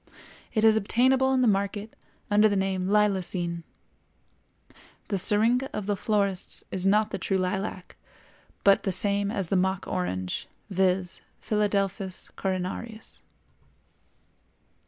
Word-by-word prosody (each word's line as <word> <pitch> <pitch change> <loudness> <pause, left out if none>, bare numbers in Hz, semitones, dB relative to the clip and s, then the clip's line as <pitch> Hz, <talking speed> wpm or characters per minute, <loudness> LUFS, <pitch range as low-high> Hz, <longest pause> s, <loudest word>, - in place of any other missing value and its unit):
It 215 - +2
is 220 -1 +6
obtainable 260 +5 +3
in 260 -1 +2
the 250 - +4
market 200 +1 -1 0.4
under 210 +1 +5
the 205 - 0
name 190 -1 0
lilacine. 190 -4 +1 1.5
The 200 -3 0
Syringa 230 +7 +2
of 210 - -3
the 205 0 0
florists 200 -2 -1
is 190 0 0
not 210 +2 +3
the 195 - -3
true 195 +1 0
lilac, 185 0 -3 0.7
but 200 -1 +5
the 195 - -1
same 200 +1 0
as 195 -6 -2
the - - +1
Mock 190 0 +1
Orange, 90 0 -3 0.2
viz., 185 -1 +1 0.2
Philadelphus 200 -3 -1
coronarius. 190 +4 -4
200 Hz, 120 wpm, -27 LUFS, 185-215 Hz, 1.5 s, is